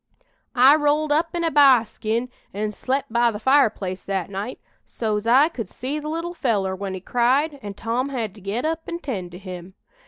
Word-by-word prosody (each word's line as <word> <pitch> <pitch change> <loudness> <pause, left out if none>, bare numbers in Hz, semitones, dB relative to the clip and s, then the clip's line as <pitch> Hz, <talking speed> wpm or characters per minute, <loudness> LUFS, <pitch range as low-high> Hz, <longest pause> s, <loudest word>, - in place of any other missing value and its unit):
"I 260 +4 +7
rolled 295 0 +1
up 325 +3 +1
in 340 - -1
a 330 - +1
b'ar 270 -5 +6
skin 225 +3 -3 0.3
an' 210 +1 -2
slep' 265 +6 -2
by 235 +1 +3
the 215 - -4
fireplace 215 -7 +2
that 195 -1 -3
night, 205 +6 -5 0.2
so's 215 -1 -3
I 265 +6 +6
could 255 -9 -6
see 275 +5 -4
the 300 0 -6
little 335 +2 -3
feller 205 - 0
when 190 0 -5
he - - -5
cried 265 - +1
an' 205 -2 -7
Tom 240 +6 -2
had 230 -7 -3
to 210 - -15
get 205 +7 -3
up 325 +1 -1
an' 340 - -3
tend 215 - -5
to - - -8
him. 185 -1 -9
240 Hz, 205 wpm, -23 LUFS, 205-290 Hz, 0.3 s, I